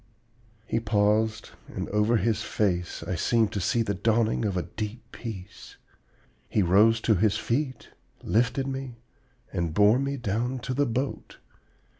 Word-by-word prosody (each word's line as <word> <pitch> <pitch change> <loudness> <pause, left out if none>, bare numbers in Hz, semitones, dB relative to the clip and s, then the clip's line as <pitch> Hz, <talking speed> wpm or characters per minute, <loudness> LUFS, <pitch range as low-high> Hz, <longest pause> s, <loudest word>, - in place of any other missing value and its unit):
"He 115 - 0
paused, 110 0 +1 0.2
and - - -5
over 105 +3 +2
his 110 -1 0
face 90 -6 -1
I - - -3
seemed 115 -3 +2
to 100 - -2
see 115 +6 +1
the 100 - -1
dawning 110 +3 +1
of 100 -3 -1
a 90 - 0
deep 110 +2 -6
peace. 100 -5 -9 0.7
He 105 - +2
rose 105 +6 +5
to 110 - +3
his 105 +1 +2
feet, 130 +2 -2 0.3
lifted 125 +4 +1
me, 135 -2 -5 0.6
and 85 -4 -2
bore 105 +4 +5
me 140 +1 -2
down 120 +3 -1
to 130 - -3
the 145 +2 +1
boat. 130 +4 -3
110 Hz, 150 wpm, -27 LUFS, 105-120 Hz, 0.7 s, rose